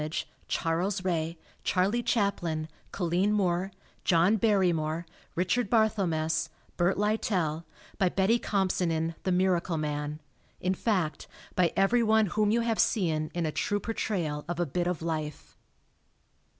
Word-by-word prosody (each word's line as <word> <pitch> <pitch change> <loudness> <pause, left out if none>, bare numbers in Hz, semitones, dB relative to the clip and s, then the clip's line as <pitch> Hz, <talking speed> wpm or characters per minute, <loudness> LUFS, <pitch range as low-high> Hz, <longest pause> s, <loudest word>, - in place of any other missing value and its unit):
ee, 155 - -3 0.4
Charles 185 +4 -1
Ray, 165 -2 -1 0.3
Charlie 195 +6 +2
Chaplin, 195 -9 0 0.2
Colleen 180 +2 +1
Moore, 190 -2 +1 0.3
John 175 +5 +4
Barrymore, 175 -7 +1 0.3
Richard 190 +6 +1
Barthel 220 -5 +3
mess, 160 0 0 0.3
Bert 175 +2 +2
Lytell, 190 -6 0 0.3
by 190 -3 +4
Betty 200 +6 +2
Compson 190 -4 0
in 165 0 -1
"The 185 - -1
Miracle 180 -2 +1
Man" 150 0 -3 0.4
in 185 +1 0
fact, 180 -7 -1 0.3
by 180 -2 +3
everyone 220 +2 +4
whom 210 -1 +2
you 230 +2 +3
have 230 -1 0
seen 160 -7 +1
in 170 -1 0
a 155 - -1
true 205 +6 0
portrayal 175 -9 -2
of 175 - -2
a 175 - +2
bit 175 +4 -1
of 180 -3 -2
life. 155 -3 -4
180 Hz, 135 wpm, -29 LUFS, 165-205 Hz, 0.4 s, John